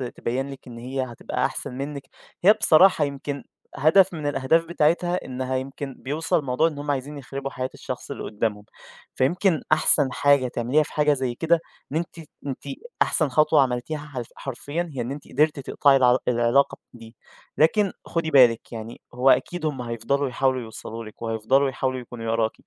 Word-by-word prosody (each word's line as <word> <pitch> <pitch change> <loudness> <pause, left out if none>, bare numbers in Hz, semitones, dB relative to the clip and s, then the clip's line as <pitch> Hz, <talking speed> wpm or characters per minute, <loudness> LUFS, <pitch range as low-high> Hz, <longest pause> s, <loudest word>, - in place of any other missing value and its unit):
تبيِّن 130 +4 -2
لِك 135 - -12
إن 120 -1 -9
هي 130 +3 -4
هتبقى 120 -3 -3
أحسن - - -4
منِّك، 140 0 -5 0.4
هي 200 +4 +8
بصراحة 160 -4 +5
يمكن 140 0 -5 0.3
هدف 175 +6 +5
من 155 -3 -4
الأهداف 145 +4 +2
بتاعتها 170 +2 +1
إنها 130 0 -3
يمكن 135 +1 -5
بيوصل 150 +5 0
الموضوع 140 +2 +1
إن 155 -3 -5
هم 145 0 -2
عايزين 145 +2 -4
يخربوا 135 0 -6
حياة 130 0 -3
الشخص - - -7
اللي - - -6
قدَّامهم، 105 -1 -2 0.5
فيمكن 170 +5 +2
أحسن 150 -3 +4
حاجة 140 -1 +3
تعمليها 125 +5 +1
في - - -12
حاجة 150 -1 +3
زي 130 -3 -2
كده، 165 +5 +2 0.3
إن 155 - 0
أنتِ 170 0 -4
ت 160 - -12 0.2
أنتِ 135 - -5 0.4
أحسن 155 -3 +2
خطوة 155 +2 +4
عملتيها 125 +4 -1
حلف 140 -5 -7
حرفيًا 145 +6 -4
هي 130 - -3
إن 120 +2 -4
أنتِ 140 0 -8
قدرتِ 155 -1 +2
تِقطَعي 140 +1 +3
العلا 125 -1 +4
العلاقة 120 +3 +2 0.2
دي، 115 -1 -13 0.4
لكن 195 +5 +3
خدي 165 -1 -2
بالك 125 -5 +5
يعني 115 0 -8
هو 125 +2 +3
أكيد 175 +4 +2
هم 145 -4 -2
هيفضلوا 125 +4 -1
يحاولوا 130 +1 0
يوصلوا 115 0 -8
لِك، 110 - -13
وهيفضلوا 115 +5 +1
يحاولوا 130 0 -2
يكونوا 115 -2 -5
وراكِ، 115 -1 +1
135 Hz, 175 wpm, -24 LUFS, 125-150 Hz, 0.5 s, هي